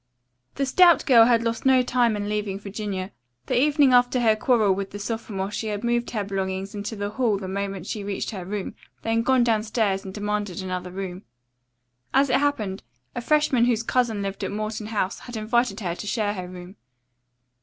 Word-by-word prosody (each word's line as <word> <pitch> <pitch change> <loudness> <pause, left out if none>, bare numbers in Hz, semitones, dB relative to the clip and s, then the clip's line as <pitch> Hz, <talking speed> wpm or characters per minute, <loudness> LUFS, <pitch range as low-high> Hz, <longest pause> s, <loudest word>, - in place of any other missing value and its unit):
The 275 - 0
stout 345 +2 +5
girl 235 -4 +7
had 230 -1 +3
lost 230 -1 -2
no 260 -1 +5
time 240 -3 +2
in 205 0 -3
leaving 205 -2 -2
Virginia. 200 -2 -5 0.3
The 245 - +1
evening 290 -2 +4
after 245 +1 +4
her 220 -2 +4
quarrel 215 -3 +3
with 195 0 -4
the 205 - -7
sophomore 205 -2 -4
she 220 - -3
had 210 0 -3
moved 240 0 0
her 215 -3 -2
belongings 195 0 -3
into 205 +2 -5
the 205 0 -3
hall 225 -3 +1
the 190 -1 -6
moment 195 -1 -4
she 210 0 -4
reached 200 -1 -3
her 190 -4 -6
room, 195 +1 -4 0.3
then 225 0 +1
gone 255 +1 +3
downstairs 220 -3 +1
and 190 - -7
demanded 205 -2 -3
another 185 -1 -4
room. 185 0 -6 0.9
As 275 -1 +4
it - - +4
happened, 220 -10 -1 0.3
a - - -2
freshman 280 -3 +3
whose 230 -2 +1
cousin 230 -4 0
lived 195 0 -4
at - - -1
Morton 215 +1 -4
House 205 -3 -2
had 245 -2 -8
invited 220 -1 0
her 175 -4 -2
to 210 - -7
share 205 0 0
her 185 -3 -6
room. 180 +1 -11
210 Hz, 195 wpm, -24 LUFS, 195-240 Hz, 0.9 s, girl